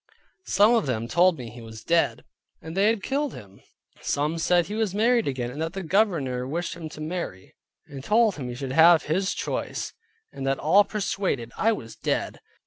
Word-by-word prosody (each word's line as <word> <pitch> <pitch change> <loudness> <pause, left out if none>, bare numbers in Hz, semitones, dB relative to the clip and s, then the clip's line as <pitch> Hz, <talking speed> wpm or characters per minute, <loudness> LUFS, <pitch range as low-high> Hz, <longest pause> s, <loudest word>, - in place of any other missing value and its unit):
Some 205 +4 +5
of 225 -9 +2
them 115 -3 -2
told 175 +5 +3
me 120 -4 -8
he 120 +1 -11
was 110 0 -10
dead, 170 0 +1 0.4
and 160 +1 -9
they 195 +2 +3
had 220 -3 +1
killed 280 0 -1
him; 100 -4 -13 0.4
some 150 +3 -1
said 175 +1 +3
he 205 - -7
was 215 -3 -1
married 235 +2 +3
again, 125 -3 -2
and 145 +5 -6
that 165 +1 -2
the 195 -1 -5
Governor 155 - +1
wished 170 +3 -3
him 165 -2 -7
to 155 - -11
marry; 155 - -5 0.3
and 135 -2 -9
told 215 +1 +3
him 130 -4 -5
he 120 - -5
should 130 0 -5
have 165 +3 +6
his 190 +5 -1
choice, - - -4 0.4
and 135 - -7
that 135 0 +1
all 190 +7 +5
persuaded 190 - -2
I 225 - +2
was 115 - -8
dead. - - -2
165 Hz, 200 wpm, -25 LUFS, 130-200 Hz, 0.4 s, have